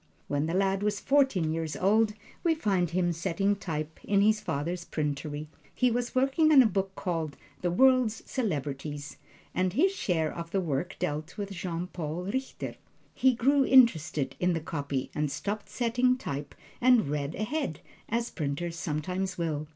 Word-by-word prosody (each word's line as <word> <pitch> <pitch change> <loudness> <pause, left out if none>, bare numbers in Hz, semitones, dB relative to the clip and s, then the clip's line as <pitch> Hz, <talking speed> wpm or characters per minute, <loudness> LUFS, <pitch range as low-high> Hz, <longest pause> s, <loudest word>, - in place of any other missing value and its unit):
When 145 +2 0
the 165 - -1
lad 195 0 +2
was 205 0 0
fourteen 265 - +2
years 160 -2 -3
old, 210 +4 +3 0.3
we 330 -2 +3
find 195 - +1
him 175 0 +1
setting 185 +5 0
type 160 -5 -5
in 200 -1 +2
his 215 +1 +4
father's 170 +2 -3
printery. 150 -1 -3 0.3
He 250 -1 +3
was 240 +1 -2
working 270 +5 +3
on 275 -4 +9
a - - +2
book 195 -2 -1
called, 165 -6 -3 0.2
"The 175 - +1
World's 250 +2 +4
Celebrities," 145 - -3 0.4
and 185 -1 +1
his 350 - +4
share 165 - 0
of 170 -1 -6
the 195 - 0
work 165 -1 -2
dealt 155 +3 -3
with 200 -1 -4
Jean 175 -2 -3
Paul 170 -1 -4
Richter. 260 +8 -4 0.4
He 260 -1 +3
grew 275 +4 +4
interested 165 - +4
in 180 0 +2
the 165 - 0
copy 140 -4 -3
and 150 -1 0
stopped 205 +8 -4
setting 245 +1 +2
type 145 - -5 0.3
and 250 - +5
read 145 +1 -2
ahead, 215 - -2 0.3
as 235 +1 -1
printers 165 +3 -3
sometimes 180 +5 -2
will. 155 -3 -2
180 Hz, 165 wpm, -29 LUFS, 155-225 Hz, 0.4 s, on